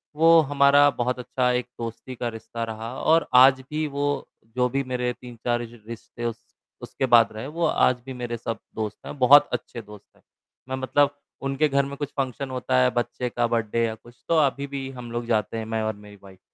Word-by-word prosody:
वो 165 +2 +6
हमारा 145 +1 +6
बहुत 125 +1 -1
अच्छा 125 0 0
एक 125 0 -1
दोस्ती 115 +2 -6
का 120 - -3
रिश्ता 115 +1 -6
रहा 115 +1 -6
और 165 +1 +3 0.2
आज 130 0 +5
भी 155 +1 -1
वो, 145 0 -2 0.3
जो 125 0 +2
भी 135 +2 -1
मेरे 125 -1 -2
3-4 120 -1 -3
जो 120 +1 -14
रिश्ते 115 +1 -8
उस 115 0 -4 0.4
उसके - - -3
बाद 120 -4 +5
रहे 110 +4 -6
वो 165 +3 -1
आज 125 -5 +2
भी 135 - -6
मेरे 120 -1 -3
सब 115 0 -4 0.2
दोस्त 110 -1 -4
हैं, - - -7
बहुत 140 +3 +7
अच्छे 120 - -4
दोस्त 105 -1 -14
हैं। - - -26 0.5
मैं 130 - -1
मतलब 140 +2 +1 0.3
उनके 135 +3 +1
घर 140 0 +2
में 140 - -6
कुछ 145 -1 -4
फंक्शन 130 0 -2
होता 130 0 -1
है, 125 - +4
बच्चे 120 +1 -2
का 120 0 0
बर्थडे 115 0 0
या 110 - -2
कुछ 120 +2 -20
तो 165 - +3
अभी 140 +1 -2
भी 135 -1 -5
हम 125 -3 -9
लोग 120 0 -3
जाते 115 -1 0
हैं, 110 - -4
मैं 110 0 -2
और 110 0 -2
मेरी 105 0 -14
वाइफ़। 95 -1 -15
125 Hz, 215 wpm, -24 LUFS, 115-140 Hz, 0.5 s, बहुत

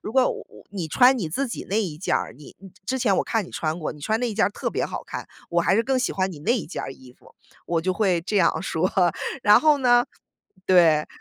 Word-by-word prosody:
如 215 - -6
果 265 - +4
我 - - -7 0.3
你 190 -5 -4
穿 255 - +5
你 170 -8 -3
自 270 - -2
己 - - -6
那 210 +3 +1
一 160 -7 -5
件 185 - 0
儿， - - -4
你 150 - -14 0.3
之 260 +3 -1
前 225 -6 +2
我 - - +1
看 225 -3 -1
你 - - -13
穿 160 +1 -3
过， 155 - -4
你 150 - -15
穿 220 +9 0
那 245 - 0
一 - - -6
件 220 - +3
儿 - - -2
特 - - -4
别 - - -1
好 - - -6
看， - - -7 0.2
我 170 0 +2
还 170 +2 +2
是 225 - +3
更 265 +1 0
喜 250 - -1
欢 190 0 -1
你 155 - -10
那 160 - +1
一 210 - -5
件 170 - -6
儿 - - -6
衣 130 -2 -16
服。 - - -22 0.3
“我 170 -1 0
就 185 +3 -1
会 185 -3 +1
这 205 +4 -2
样 185 -2 +2
说， 180 -1 -1 0.5
然 210 0 +6
后 305 -2 +4
呢 245 -2 +4 0.6
对。 165 -5 +4
190 Hz, 285 characters per minute, -24 LUFS, 165-230 Hz, 0.6 s, 然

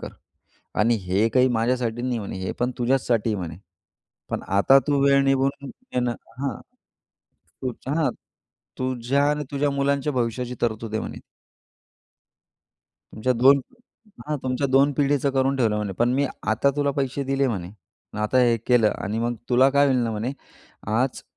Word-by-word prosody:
कर - - -6 0.7
आणि 115 +3 +4
हे 95 +4 +1
काही 130 +2 +3
माझ्यासाठी 120 0 0
नाही," 125 -2 -1
म्हणे, 100 -3 -6
"हे 95 - -3
पण 125 +1 +1
तुझ्याचसाठी," 120 -3 +1
म्हणे, 85 -4 -5 0.7
"पण - - -2 0.2
आता 135 +7 +6
तू 145 -1 +2
वेळ 140 0 +5
निभावून 135 +1 0 0.2
घेणं" 125 -1 0 0.3
हां, 135 -5 -3 1.0
तुझ्या 130 +2 -4
हां, 160 - +2 0.7
"तुझ्या 130 +2 0
आणि 150 0 -1
तुझ्या 140 +1 +1
मुलांच्या 140 +1 0
भविष्याची 125 0 -2
तरतूद 110 -1 -2
आहे," 110 - 0
म्हणे. - - -7 1.9
तुमच्या 125 +4 0
2 135 +3 +5 0.7
हां, 150 0 -1
तुमच्या 130 +2 -1
2 135 +2 +4
पिढीचं 140 0 +1
करून 135 0 +1
ठेवलं 110 -4 +1
म्हणे. 105 -2 -2
पण 120 +5 +1
मी 140 +1 +2 0.2
आता 110 +6 +3
तुला 145 -1 +1
पैसे 135 0 -1
दिले 135 0 +1
म्हणे, 95 -6 -4 0.5
आता 115 +4 +1
हे 120 -2 +4
केलं 120 -4 +4
आणि 105 +3 -3
मग 120 +1 -1 0.2
तुला 130 +2 +5
काय 140 +1 +4
होईल 130 -2 +2
ना 115 - -1
म्हणे, 110 +4 -3 0.6
आज 120 +4 0
125 Hz, 155 wpm, -24 LUFS, 115-140 Hz, 1.9 s, आता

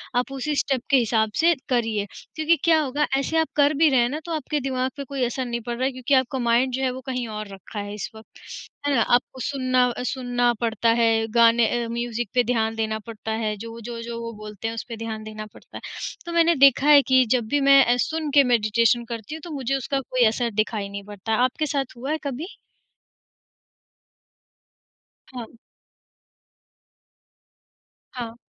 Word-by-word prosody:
आप 250 +2 0
उसी 275 +2 -2
स्टेप 270 -3 0
के 275 - +5
हिसाब 220 -3 +1
से 340 +1 +5 0.2
करिए। 225 -5 0 0.3
क्योंकि 315 +1 +3
क्या 325 -2 +5
होगा 290 +1 -1
ऐसे 275 +4 -1
आप 320 0 +2
कर 290 0 +4
भी 315 - +7
रहे 265 -3 +3
हैं 240 0 +2
ना 295 +4 -4
तो 340 - -6
आपके 300 -1 -2
दिमाग 260 0 -1
पे 280 - -4
कोई 270 -1 -2
असर 255 +2 -3
नहीं 235 -1 -3
पड़ 240 - -2
रहा 255 - 0
है 270 - +1
क्योंकि 255 +2 -2
आपका 260 0 +2
माइंड 240 +2 +2
जो - - -3
है 260 - +2
वो 260 - -7
कहीं 250 -3 -3
और 215 -1 -6
रखा 195 +3 -8
है 205 0 -5
इस 210 - -5
वक़्त, 220 0 -15 0.5
है 285 - +2
ना? 235 - +3
आपको 245 +2 +1
सुनना 255 -2 +1
सुनना 245 -2 0
पड़ता 230 0 +1
है, 230 - +4 0.3
गाने 235 0 +5 0.2
अ, - - -5
म्यूज़िक 235 -1 -3
पे 245 - +3
ध्यान 225 -2 0
देना 220 -1 -2
पड़ता 220 -1 -6
है, 215 0 -1
जो-जो-जो 230 +1 -7
वो 230 0 -5
बोलते 210 0 -7
हैं, 225 - -4
उस 230 - -4
पे 230 - -5
ध्यान 220 -1 -5
देना 215 0 -7
पड़ता - - -12
है। - - -10 0.4
तो 340 - -5
मैंने 335 0 +4
देखा 275 +1 +4
है 295 -1 +8
कि 260 -1 +5
जब 235 -3 -1
भी 290 +5 +1
मैं 275 -1 +8
अ, 240 - +3
सुन 315 -1 -3
के 285 - +8
मेडिटेशन 230 +2 +2
करती 230 +5 -6
हूँ 315 - -9
तो 345 - -8
मुझे 270 -1 -1
उसका 270 +1 -2
कोई 255 -2 +1
असर 235 +1 -1
दिखाई 215 -2 -4
नहीं 200 0 -7
पड़ता 205 +1 -7
है। 220 - +2
आपके 255 +5 0
साथ 275 -4 -3
हुआ 265 +5 -4
है 310 - 0
कभी? 285 - -5 2.7
हाँ। 240 -2 -9 2.6
हाँ। 235 -2 -6
245 Hz, 200 wpm, -23 LUFS, 225-275 Hz, 2.7 s, है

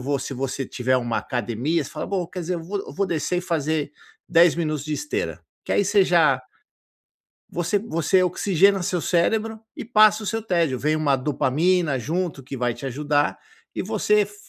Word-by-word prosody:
vou", 140 +2 -1
se 135 +2 -5
você 135 +1 -3
tiver 130 +1 0
uma 120 -2 -1
academia, 125 +7 -1
você - - -8
fala - - -5
vou 185 -3 -2
quer 180 0 -6
dizer 175 +2 -2
eu 165 - -6
vou 200 +4 -3
eu - - -9
vou 200 0 -1
descer 175 +1 -1
e - - -1
fazer 155 -4 -1 0.4
10 170 -1 +5
minutos 155 -3 -2
de 155 - -4
esteira. 390 - -3 0.2
Que - - -2
aí - - +3
você 200 -1 +4
já 155 -8 +3 1.1
você 175 +4 0
você 185 -3 +1
oxigena 190 +1 +2
seu 175 -1 -1
cérebro 220 +7 +1 0.2
e - - -6
passa 215 -2 +5
o - - -6
seu 225 +3 -2
tédio, 170 - 0
vem 155 +2 +1
uma 145 -3 +2
dopamina 150 +3 +1
junto 160 0 -3
que 135 +1 -7
vai 120 -1 0
te 135 - -8
ajudar, 145 +2 0 0.4
e - - -1
você 210 +1 +1
f 205 +1 -4
165 Hz, 195 wpm, -23 LUFS, 140-190 Hz, 1.1 s, 10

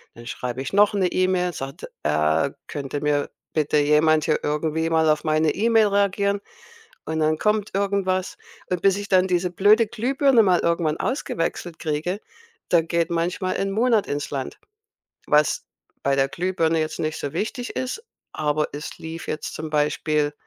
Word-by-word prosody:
Dann 120 0 -11
schreibe 125 +1 -4
ich 135 - -5
noch 205 +1 +5
'ne 190 -3 +2
E-Mail, 180 -1 +1
sagt: 135 0 -6 0.2
„Äh, 75 - +2 0.2
könnte 145 0 -4
mir 145 -1 0 0.2
bitte 150 -1 +1
jemand 150 +1 +4
hier 155 - +1
irgendwie 160 +2 -1
mal 160 -1 +3
auf 150 0 +2
meine 155 0 +2
E-Mail 225 0 +4
reagieren?“ 200 0 +1 0.6
Und 160 0 -2
dann 155 0 +2
kommt 210 0 0
irgendwas. 195 - 0 0.3
Und 180 - 0
bis 195 -1 +3
ich 205 0 -5
dann 185 -1 +4
diese 180 0 0
blöde 210 +5 +5
Glühbirne 260 +3 +2
mal 185 -4 +3
irgendwann 170 -2 +1
ausgewechselt 175 - -3
kriege, 160 +5 -2 0.5
dann 165 -2 +3
geht 170 0 0
manchmal 175 +2 -1
'n 195 - -1
Monat 225 0 +2
ins 145 +1 -3
Land. 135 -2 -4 0.7
Was 150 -1 +2 0.4
bei 140 - +3
der 135 0 +2
Glühbirne 165 0 0
jetzt 155 0 -2
nicht 155 0 -2
so 140 - -4
wichtig 240 - -3
ist, 255 - -3 0.3
aber 150 0 0
es 150 +2 -7
lief 165 +1 -7
jetzt 155 - -4
zum 155 0 -5
Beispiel 150 0 +1
165 Hz, 165 wpm, -23 LUFS, 150-195 Hz, 0.7 s, noch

